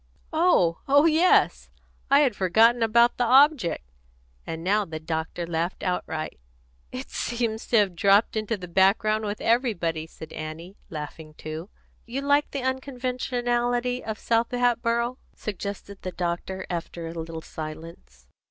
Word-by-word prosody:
"Oh! 315 Hz, -, +3 dB
Oh 285 Hz, +2 st, +5 dB
yes. 330 Hz, +3 st, +3 dB, 0.4 s
I 280 Hz, +2 st, +6 dB
had 265 Hz, -7 st, +2 dB
forgot 220 Hz, +6 st, +4 dB
about 235 Hz, +2 st, +4 dB
the 245 Hz, -, +2 dB
object," 265 Hz, -, +4 dB, 0.6 s
and 160 Hz, 0 st, -5 dB
now 205 Hz, +4 st, +2 dB
the 160 Hz, -4 st, -6 dB
doctor 160 Hz, +2 st, -3 dB
laughed 170 Hz, +1 st, -3 dB
outright. 160 Hz, -, -3 dB, 0.5 s
"It -, -, -7 dB
seems 230 Hz, -2 st, -2 dB
to 235 Hz, -, +3 dB
have 200 Hz, -4 st, +2 dB
dropped 200 Hz, +6 st, +4 dB
into 215 Hz, +1 st, -1 dB
the 180 Hz, -2 st, -8 dB
background 205 Hz, +4 st, +2 dB
with 205 Hz, 0 st, -3 dB
everybody," 180 Hz, -10 st, 0 dB
said 160 Hz, -1 st, -11 dB
Annie, 160 Hz, +4 st, -7 dB
laughing 155 Hz, 0 st, -8 dB
too. 155 Hz, +5 st, -7 dB, 0.4 s
"You 255 Hz, +4 st, -3 dB
like 285 Hz, +1 st, +2 dB
the 275 Hz, -2 st, -4 dB
unconventionality 250 Hz, -2 st, -1 dB
of 220 Hz, -1 st, -4 dB
South 230 Hz, +1 st, +1 dB
Hatboro'?" 240 Hz, 0 st, 0 dB, 0.2 s
suggested 200 Hz, -1 st, -6 dB
the 185 Hz, -, -4 dB
doctor, 180 Hz, +2 st, -3 dB
after 170 Hz, -1 st, -5 dB
a 165 Hz, -, -6 dB
little 165 Hz, -1 st, -6 dB
silence. 155 Hz, -, -9 dB
210 Hz, 140 wpm, -25 LUFS, 170-245 Hz, 0.6 s, I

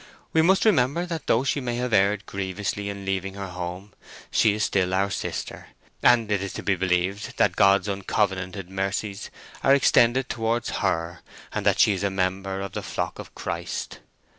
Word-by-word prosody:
We 160 Hz, -, +5 dB
must 190 Hz, +6 st, +3 dB
remember 170 Hz, -, +3 dB
that 165 Hz, -3 st, -5 dB
though 115 Hz, -, +3 dB
she 140 Hz, +1 st, 0 dB
may 120 Hz, -2 st, -2 dB
have 125 Hz, -1 st, -2 dB
erred 100 Hz, +1 st, +3 dB
grievously 100 Hz, +1 st, -3 dB
in 100 Hz, -1 st, -6 dB
leaving 95 Hz, 0 st, -2 dB
her 100 Hz, -2 st, -5 dB
home, 90 Hz, +3 st, -6 dB, 0.4 s
she 105 Hz, -, +4 dB
is 105 Hz, -, -1 dB
still 95 Hz, -2 st, +1 dB
our 100 Hz, +1 st, +1 dB
sister: -, -, -5 dB, 0.3 s
and 115 Hz, -3 st, +4 dB
it 100 Hz, -2 st, +1 dB
is 100 Hz, -, -4 dB
to -, -, -6 dB
be 100 Hz, -, +2 dB
believed 90 Hz, +2 st, -1 dB
that -, -, +3 dB
God's 100 Hz, +1 st, +4 dB
uncovenanted 95 Hz, -2 st, -1 dB
mercies 100 Hz, +2 st, -3 dB, 0.3 s
are 135 Hz, -, +5 dB
extended 130 Hz, -1 st, +4 dB
towards 115 Hz, -1 st, -1 dB
her, 85 Hz, -3 st, -1 dB, 0.3 s
and -, -, -1 dB
that -, -, +4 dB
she 105 Hz, -, +5 dB
is 95 Hz, -, -4 dB
a 100 Hz, -, +2 dB
member 95 Hz, 0 st, -2 dB
of 100 Hz, -1 st, -5 dB
the -, -, -4 dB
flock -, -, -4 dB
of -, -, -10 dB
Christ." -, -, -5 dB
100 Hz, 185 wpm, -25 LUFS, 95-115 Hz, 0.4 s, We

